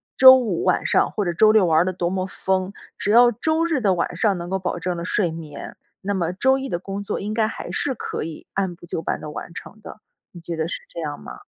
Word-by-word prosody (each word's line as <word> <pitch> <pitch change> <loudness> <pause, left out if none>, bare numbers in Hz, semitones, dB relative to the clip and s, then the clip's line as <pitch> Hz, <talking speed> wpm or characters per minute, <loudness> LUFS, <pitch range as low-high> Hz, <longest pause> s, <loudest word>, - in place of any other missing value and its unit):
周 260 0 +10
五 220 -9 -1
晚 185 - +1
上 - - +3
或 205 - -2
者 175 - -1
周 215 +5 +5
六 215 -3 +5
玩 160 -2 +4
儿 170 - +3
得 185 - 0
多 175 -1 -2
么 185 0 -2
疯， 190 0 -1 0.3
只 - - -1
要 240 +3 +7
周 315 +8 0
日 315 -6 0
的 195 -4 +2
晚 175 0 -2
上 200 +2 +1
能 170 0 -6
够 190 - 0
保 180 - -3
证 180 -1 -2
了 170 - -5
睡 180 -2 0
眠， 160 -3 -8 0.3
那 200 +1 -2
么 175 -3 -1
周 265 +8 +2
一 270 0 -5
的 175 - -1
工 195 +3 -6
作 205 - -3
应 210 +2 -4
该 220 0 +2
还 - - -6
是 270 -3 -1
可 - - -4
以 160 0 -8
按 190 -3 -1
部 170 - -14
就 165 - -4
班 - - -2
地 - - -8
完 165 +2 -8
成 215 - -10
的。 215 - -11 0.3
你 175 - -11
觉 170 0 -5
得 160 0 -2
是 175 - -5
这 - - -6
样 - - -4
吗？ - - -10
190 Hz, 290 characters per minute, -22 LUFS, 175-220 Hz, 0.3 s, 周